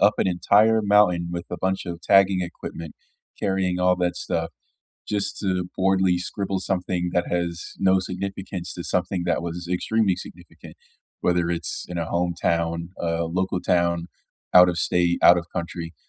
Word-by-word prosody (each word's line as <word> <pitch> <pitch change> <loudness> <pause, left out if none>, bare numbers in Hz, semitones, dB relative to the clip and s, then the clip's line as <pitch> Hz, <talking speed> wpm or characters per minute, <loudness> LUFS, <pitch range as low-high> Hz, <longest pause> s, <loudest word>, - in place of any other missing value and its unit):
up 105 +1 +5
an - - +2
entire 105 +5 +4
mountain 100 -4 +3
with 85 0 -5
a - - -3
bunch 95 +1 -1
of 85 -2 -6
tagging 95 0 +4
equipment, 85 -2 -7 0.5
carrying 95 -2 0
all 90 0 +3
that 90 -1 0
stuff 85 -2 -2 0.6
just 105 -1 -1
to 95 -3 -1
boredly 95 -1 +2
scribble 95 +1 -3
something 90 -2 -1
that 90 - +2
has 85 -1 -3
no 95 -1 +3
significance 95 0 -5
to 85 - -6
something 90 0 -1
that 85 - 0
was 85 +1 -5
extremely 105 +1 +1
significant, 90 - -12 0.5
whether 85 -1 +1
it's 85 -1 -3
in 90 - -6
a 85 - -1
hometown, 85 -1 -1
uh, 85 0 0
local 90 +2 -1
town, 85 -1 +1 0.4
out 90 0 +8
of 90 - -1
state, 85 +1 +1
out 90 - +8
of 85 - -6
country. 85 -1 -5
90 Hz, 160 wpm, -24 LUFS, 85-95 Hz, 0.6 s, out